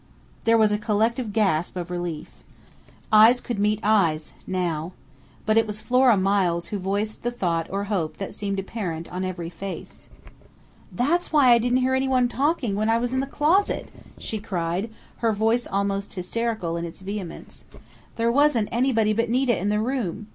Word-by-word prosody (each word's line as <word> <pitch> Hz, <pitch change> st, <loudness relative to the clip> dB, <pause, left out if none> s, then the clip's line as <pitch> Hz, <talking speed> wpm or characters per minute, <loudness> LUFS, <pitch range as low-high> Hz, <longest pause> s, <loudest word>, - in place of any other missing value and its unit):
_" -, -, -31 dB
There 230 Hz, 0 st, +5 dB
was 215 Hz, -1 st, +4 dB
a 210 Hz, -, 0 dB
collective 220 Hz, +2 st, 0 dB
gasp 190 Hz, -7 st, +1 dB
of 175 Hz, 0 st, -5 dB
relief. 175 Hz, -3 st, -5 dB, 0.8 s
Eyes 220 Hz, +3 st, +7 dB
could 240 Hz, -4 st, -4 dB
meet 210 Hz, +1 st, +1 dB
eyes 170 Hz, -8 st, +2 dB
now. 175 Hz, -2 st, -2 dB, 0.5 s
But 220 Hz, 0 st, +4 dB
it 225 Hz, -, 0 dB
was 210 Hz, 0 st, -5 dB
Flora 250 Hz, -2 st, +4 dB
Miles 185 Hz, -3 st, +1 dB
who 205 Hz, -, -3 dB
voiced 205 Hz, +3 st, -2 dB
the 240 Hz, -, -1 dB
thought 170 Hz, -8 st, -1 dB
or 200 Hz, +1 st, -2 dB
hope 175 Hz, -7 st, -2 dB
that 195 Hz, -, -5 dB
seemed 200 Hz, -1 st, -3 dB
apparent 185 Hz, -5 st, -4 dB
on 180 Hz, +1 st, -3 dB
every 175 Hz, -2 st, -4 dB
face. 190 Hz, +2 st, -8 dB, 0.8 s
"That's 330 Hz, +9 st, 0 dB
why 290 Hz, -5 st, +5 dB
I 235 Hz, -, +7 dB
didn't 245 Hz, +2 st, +1 dB
hear 260 Hz, -, +1 dB
anyone 260 Hz, -1 st, +2 dB
talking 275 Hz, -3 st, 0 dB
when 215 Hz, +2 st, 0 dB
I 225 Hz, -, +4 dB
was 245 Hz, +1 st, -2 dB
in 260 Hz, -, +1 dB
the 270 Hz, -, -1 dB
closet!" 315 Hz, +8 st, +1 dB, 0.3 s
she 220 Hz, -, -4 dB
cried, 185 Hz, 0 st, -2 dB, 0.3 s
her 230 Hz, -1 st, +1 dB
voice 225 Hz, +3 st, +1 dB
almost 200 Hz, 0 st, -2 dB
hysterical 185 Hz, -2 st, -2 dB
in 170 Hz, -, -3 dB
its 170 Hz, +2 st, -9 dB
vehemence. 195 Hz, -2 st, -7 dB, 0.5 s
"_There 230 Hz, +1 st, +1 dB
wasn't 270 Hz, -6 st, +3 dB
anybody 230 Hz, -3 st, +2 dB
but 230 Hz, +1 st, 0 dB
Nita 250 Hz, 0 st, +2 dB
in 195 Hz, +3 st, -1 dB
the 210 Hz, 0 st, +1 dB
room! 220 Hz, -4 st, -3 dB
210 Hz, 175 wpm, -24 LUFS, 185-240 Hz, 0.8 s, Eyes